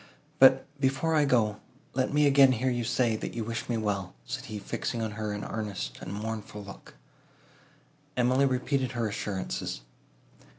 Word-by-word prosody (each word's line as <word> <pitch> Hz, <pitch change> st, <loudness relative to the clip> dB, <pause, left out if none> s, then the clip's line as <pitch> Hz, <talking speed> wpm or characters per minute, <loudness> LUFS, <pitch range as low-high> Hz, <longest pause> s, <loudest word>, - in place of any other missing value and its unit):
But, 130 Hz, 0 st, +7 dB
before 135 Hz, +4 st, +1 dB
I 150 Hz, -2 st, +4 dB
go, 110 Hz, -6 st, +2 dB, 0.3 s
let 130 Hz, 0 st, 0 dB
me 150 Hz, +1 st, +4 dB
again 135 Hz, -2 st, +7 dB
hear 130 Hz, +2 st, 0 dB
you 120 Hz, -1 st, -1 dB
say, 120 Hz, -1 st, +1 dB
that -, -, -5 dB
you 115 Hz, -, -2 dB
wish 115 Hz, +2 st, -4 dB
me 120 Hz, -, +1 dB
well," 100 Hz, -, -2 dB
said -, -, -5 dB
he, 110 Hz, -, -5 dB
fixing 115 Hz, +3 st, -3 dB
on 110 Hz, -1 st, -2 dB
her 105 Hz, 0 st, -3 dB
an 105 Hz, 0 st, -4 dB
earnest 100 Hz, -, -4 dB
and 90 Hz, -, -6 dB
mournful 105 Hz, 0 st, -5 dB
look. 100 Hz, 0 st, -12 dB, 1.2 s
Emily 130 Hz, +3 st, +4 dB
repeated 130 Hz, 0 st, 0 dB
her 120 Hz, -2 st, 0 dB
assurances. 100 Hz, -, -3 dB
115 Hz, 165 wpm, -29 LUFS, 105-130 Hz, 1.2 s, But